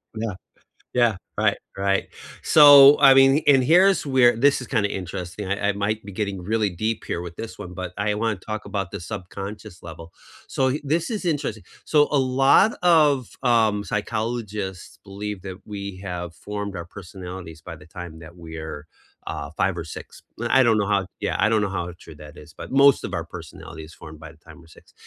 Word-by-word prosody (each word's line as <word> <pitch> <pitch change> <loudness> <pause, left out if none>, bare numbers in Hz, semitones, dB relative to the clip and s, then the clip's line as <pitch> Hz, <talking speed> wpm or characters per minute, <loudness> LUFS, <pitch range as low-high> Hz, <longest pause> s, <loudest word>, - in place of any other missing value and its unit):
Yeah, 110 -1 -3 0.6
yeah. 120 -4 +2 0.2
Right, - - +2 0.2
right. 100 0 0 0.3
So, 145 -2 +8
I 135 -1 +8
mean 135 +3 +5
and 135 -3 +5
here's 185 +5 +4
where 130 -4 +4
this 140 +4 +3
is - - -8
kinda 110 -6 0
interesting, 90 +1 -6
I 100 +1 0
I - - 0
might 100 +1 -2
be 100 - -9
getting 100 -2 -4
really 110 +2 0
deep 110 +6 -3
here 85 - -3
with 85 -1 -8
this 115 - -8
one, 90 - -8
but 90 -2 -6
I 105 +1 0
wanna 110 0 -1
talk 110 -1 -7
about 100 -3 -4
the - - -7
subconscious 95 +2 -8
level. 85 0 -11 0.3
So 135 - 0
y 140 +4 -2
this 160 +4 0
is 215 -4 -4
interesting 145 - -2 0.2
so 150 -1 +3
a 145 - +3
lot 135 - +4
of, 150 -8 +3
um, 110 -4 +2
psychologists 105 -2 -4
believe 100 0 -6
that 95 -1 -8
we 100 -2 -6
have 90 -3 -6
formed 100 -1 -6
our 85 - -5
personalities 90 -3 -10
by - - -8
the 75 - -16
time 85 -1 -9
that 85 +2 -13
we're, 80 -2 -8 0.4
uh, - - -5
5 - - 0
or - - -4
6. - - -10 0.2
L - - -2
I 130 - +5
don't 115 -2 +3
know 105 - 0
how 100 -2 0
Yeah, - - -1
I 110 - +3
don't 110 -2 +2
know 100 - 0
how 90 -2 -4
true 80 - -13
that 75 0 -13
is, - - -14
but - - -10
most 140 +1 +5
of - - -5
our - - -3
personality 80 - -10
is 80 - -14
formed 80 -1 -12
by 80 - -10
the 80 - -23
time 80 +1 -16
we're 85 - -18
6. - - -20
105 Hz, 205 wpm, -23 LUFS, 90-125 Hz, 0.6 s, So